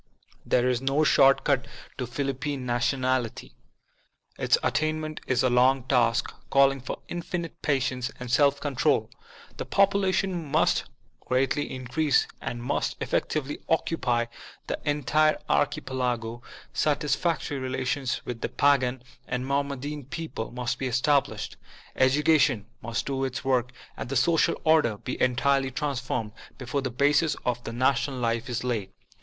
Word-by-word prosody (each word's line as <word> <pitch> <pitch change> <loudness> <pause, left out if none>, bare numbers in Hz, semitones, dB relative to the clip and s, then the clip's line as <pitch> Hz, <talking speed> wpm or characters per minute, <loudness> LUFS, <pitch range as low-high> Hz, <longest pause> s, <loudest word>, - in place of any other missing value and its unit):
There 125 0 +3
is 125 -1 +1
no 135 +3 +2
short 135 -2 +5
cut - - +1 0.3
to 125 - -2
Philippine 135 +1 -3
Nationality. 125 0 -1 0.9
Its - - +3
attainment 155 0 -1
is 130 -1 +2
a 130 - +3
long 130 +1 +4
task, 120 -2 +2 0.2
calling 135 -1 +4
for 130 - -6
infinite 170 -1 -5
patience 130 -3 0
and 125 -1 -6
self 140 +1 +4
control. 140 -4 +1 0.5
The - - -4
population' 190 -4 +1
must - - +2 0.3
greatly 135 +3 0
increase 130 +4 +1 0.2
and 120 0 -4
must - - -1
effectively 145 -2 -1
occupy 125 -7 +1 0.4
the - - -3
entire 150 +2 +2
archipelago, 125 -4 -1 0.3
satisfac 150 +3 +1
f - - -7
tory 140 - -3
relations 130 0 -2
with 120 -2 -5
the - - -2
Pagan 130 -3 +2 0.2
and 125 0 -2
Mohammedan 140 +1 -2
peoples'^ 140 -5 -5
must 125 0 -3
be 130 - -1
established, 135 +3 0 0.4
education 135 -4 +3 0.2
must 115 +1 -3
do 135 -1 -2
its 130 +1 -3
work, 125 -2 +1 0.2
and - - -6
the 135 - -2
social 165 +6 +3
order 155 -9 +3
be 125 - -5
entirely 135 +2 +2
transformed, 130 -5 -2 0.3
before 135 +2 -2
the 130 - -2
basis 145 +5 +2
of 120 -1 -2
national 130 +2 +1
life 115 0 -1
is 120 -1 -2
laid. 115 -6 -2
130 Hz, 135 wpm, -27 LUFS, 125-145 Hz, 0.9 s, short